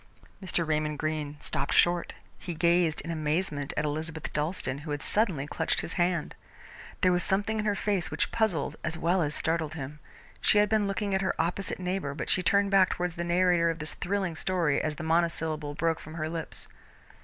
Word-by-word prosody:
Mr. 175 -3 0
Raymond 150 -1 0
Greene 150 -1 -2
stopped 140 -1 -1
short. 175 0 +3 0.3
He 175 - -5
gazed 170 -1 +3
in 165 - -5
amazement 155 -2 0
at 150 - +1
Elizabeth 155 +1 -4
Dalstan, 150 -3 -1
who 150 +1 -9
had 145 -1 -3
suddenly 185 -10 +2
clutched - - 0
his 165 - -5
hand. 175 -3 0 0.7
There 185 - +5
was 180 0 +2
something 205 +4 0
in 210 - -1
her 205 -1 +2
face 200 -3 -1
which - - -1
puzzled 215 -10 0
as 165 0 -1
well 175 +3 +2
as 150 -1 -1
startled 160 -1 -1
him. 145 0 -6 0.4
She - - +4
had 210 0 +5
been 215 -2 +2
looking 200 0 -1
at 190 - +2
her 190 - -1
opposite 180 +4 -1
neighbour 180 -6 -2
but - - 0
she 185 - +3
turned 200 +2 +3
back 190 -1 +5
towards 180 -1 -2
the 170 - -3
narrator 175 -1 +3
of 165 - -2
this 155 -1 -5
thrilling 190 -2 -2
story 170 -4 +1
as 155 -1 -2
the 155 - -6
monosyllable 160 -2 0
broke 165 +1 0
from 155 +1 -10
her 155 -1 -2
lips. 165 -1 -5
170 Hz, 200 wpm, -29 LUFS, 155-185 Hz, 0.7 s, There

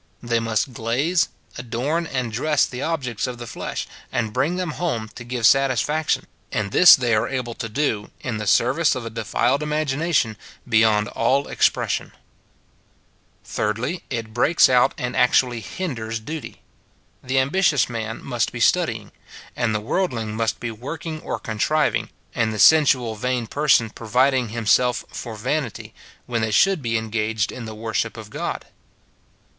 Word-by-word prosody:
They 120 -1 +1
must 115 +3 -1
glaze, 130 +11 +1 0.3
adorn, 130 +8 -2
and 130 -5 -2
dress 150 +5 +2
the 125 +1 -7
objects 130 -9 -2
of 125 -1 -5
the 120 - -7
flesh, 110 - -5 0.2
and 110 -3 -2
bring 140 +9 +1
them 180 -3 -2
home 120 -11 -3
to - - -9
give 120 -1 -2
satisfaction; 135 +4 +2 0.3
and 100 -2 -2
this 180 - +9
they 125 -5 0
are 110 +2 +2
able 125 -3 -3
to 115 -1 -6
do, 110 -4 -1
in 120 -4 -4
the 105 - -4
service 145 +10 +3
of 125 -2 -5
a 115 - -5
defiled 120 +4 0
imagination, 150 -5 0 0.3
beyond 110 -2 +3
all 135 +5 +1
expression. - - 0 1.3
MJy. 115 - -2
It 115 -4 -4
breaks 170 +8 +4
out 125 +1 +4
and 125 -3 -3
actually 125 -1 +3
hinders 115 - -4
duty. 150 +7 -8 0.6
The 130 +1 -2
ambitious 145 +2 +3
man 115 -2 -5
must 120 -4 -1
be 120 - -6
studying, 120 - +1 0.4
and 115 -3 0
the - - +1
worldling 115 - -2
must 110 0 -1
be 120 - -4
working 155 +7 -6
or - - -3
contriving, 125 +8 0 0.2
and 110 0 0
the 110 - -4
sensual, 130 -4 +5
vain 125 +2 -2
person 135 -3 +2
providing 125 +2 +1
himself 120 +2 +1
for 115 -3 -6
vanity, 125 +2 -3 0.3
when 115 -2 -2
they 110 - 0
should 190 - +3
be 115 -2 0
en 110 -1 -5
gaged 110 -1 0
in 125 - -7
the 110 -1 -7
worship 110 -1 -2
of - - -10
God. - - -4
120 Hz, 155 wpm, -22 LUFS, 110-140 Hz, 1.3 s, this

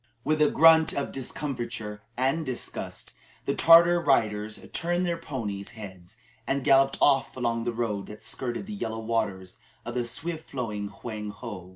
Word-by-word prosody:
With 155 0 +1
a 150 - +6
grunt 160 -1 +6
of 140 - -2
discomfiture 120 -6 -5 0.2
and 135 +6 +1
disgust, 130 -4 -4 0.3
the - - +1
Tartar 170 +3 +7
riders 110 -7 +1
turned 175 +2 0
their 170 -1 0
ponies' 110 -10 -5
heads 95 -1 -10 0.3
and 140 0 0
galloped 135 +1 +4
off 135 -2 +3
along 115 -2 -1
the 120 - 0
road 110 -4 -2
that 105 - -10
skirted 125 +6 -4
the 215 - -7
yellow 115 - -4
waters 110 -5 -2 0.3
of 120 - -5
the 120 -1 -1
swift 160 +6 -5
flowing 110 -6 -3
Hwang 105 +1 -6
ho. 105 -4 -8
120 Hz, 160 wpm, -27 LUFS, 105-145 Hz, 0.3 s, Tartar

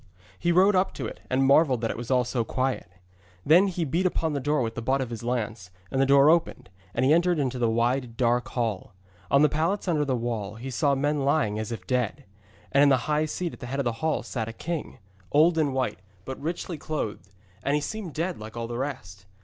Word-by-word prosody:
He 175 - +1
rode 190 +3 +5
up 185 +1 +1
to - - -4
it, - - -7
and 135 +1 +2
marvelled 135 -3 +4
that 115 - 0
it - - -5
was 120 +1 -7
all 125 -1 +3
so 120 -1 -1
quiet. 130 -4 -2 0.6
Then 175 +6 +6
he 175 -3 -2
beat 170 +6 +1
upon 160 -3 -1
the 140 - -1
door 145 0 +1
with 115 -1 -3
the 115 - -5
butt 130 +4 +1
of 130 -3 -3
his 115 - -5
lance, 115 -5 -3 0.2
and 135 - +1
the 135 - +3
door 140 +1 +6
opened, 165 - 0 0.2
and 130 - +2
he 140 - +5
entered 175 +1 +3
into 130 -3 -1
the 120 -2 +2
wide 120 +1 0
dark 120 -1 +2
hall. 110 -6 -3 0.3
On 140 +1 +5
the - - +7
pallets 165 +8 -1
under 155 -4 +2
the 135 -3 0
wall 115 -4 -3
he 130 +4 -7
saw 140 +3 +2
men 145 +2 0
lying 135 -7 +1
as 110 +1 -4
if 105 -5 -6
dead. 125 +3 -1 0.5
And 140 - +4
in 145 - +6
the 130 -3 +2
high 150 0 +1
seat 170 +2 -3
at - - -11
the 125 - -7
head 135 +3 -3
of 140 - 0
the 120 - +1
hall 160 -1 0
sat 115 -3 -4
a - - -7
king, 165 +4 -5 0.3
old 160 +4 +5
and 150 -3 +2
white, 130 -1 -1 0.3
but 130 0 -6
richly 170 +1 -4
clothed, 105 - -4 0.3
and 140 +6 +1
he 150 - +1
seemed 195 -1 -5
dead 170 -1 -2
like 110 +2 -9
all 115 - -3
the 120 +1 -5
rest. 100 -9 -6
135 Hz, 240 wpm, -26 LUFS, 120-155 Hz, 0.6 s, the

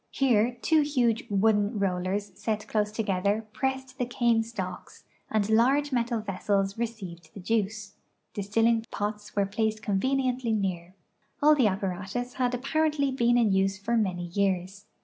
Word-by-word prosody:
Here 245 -2 +2
two 315 -1 +4
huge 250 -6 +1
wooden 205 +1 +2
rollers 195 +1 -1
set 215 -1 -3
close 210 -1 0
to 225 - -1
gether 200 +2 0
pressed 265 +2 -3
the 245 - 0
cane 235 -2 +2
stalks 195 -5 -7 0.3
and 215 -2 +1
large 265 +7 +3
metal 235 -2 0
ve.ssels 195 -1 -1
received 185 -9 -5
the - - -7
juice. 210 +1 -2 0.4
Distilling 225 +3 +1
pots 210 0 -4
were 200 -1 +2
placed 215 +2 -1
convenient!}'' 255 +5 0
near. 190 -6 -2 0.5
All 305 +1 +7
the 265 -7 +4
apparatus 195 +5 -3
had 250 -1 0
apparently 290 +2 0
been 240 -2 +2
in 225 -4 +3
use 195 0 +2
for 225 +4 -1
many 185 -6 0
years. 195 +2 -2
215 Hz, 150 wpm, -27 LUFS, 195-245 Hz, 0.5 s, All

